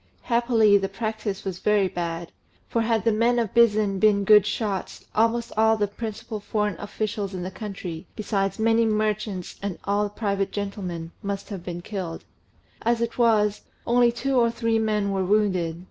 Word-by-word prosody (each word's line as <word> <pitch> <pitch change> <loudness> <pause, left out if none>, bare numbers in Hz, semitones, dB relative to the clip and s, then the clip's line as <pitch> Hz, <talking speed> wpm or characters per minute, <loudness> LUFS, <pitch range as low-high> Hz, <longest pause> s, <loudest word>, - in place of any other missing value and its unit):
Happily, 235 -4 +4
the 195 0 -2
practice 215 -1 -4
was 185 -2 -4
very 210 -2 +3
bad; 170 -1 -4 0.4
for 230 - 0
had 225 -1 +1
the 230 - +4
men 230 +3 +2
of 230 -5 -1
Bizen 215 -4 +3
been 205 -1 +4
good 210 0 +6
shots, 205 -3 -3
almost 230 +1 +1
all 220 +1 +4
the 210 - +2
principal 215 +1 -6
foreign 210 0 -1
officials 205 -1 -3
in 180 - -4
the 185 - -5
country, 190 -4 -7
besides 195 -2 -1
many 225 +1 +3
merchants 215 -3 -1
and 200 -3 -3 0.4
private 200 -3 -1
gentlemen, 185 -5 -4
must 200 0 -4
have 195 -5 -6
been 175 -1 -5
killed: 180 -4 -5 0.6
as 235 +1 +1
it 235 +1 -3
was, 210 -3 +3 0.2
only 240 0 +4
two 265 +3 -1
or 235 -1 +4
three 230 -1 0
men 210 -2 0
were 190 -1 0
wounded. 185 -5 +1
210 Hz, 165 wpm, -25 LUFS, 195-225 Hz, 0.6 s, good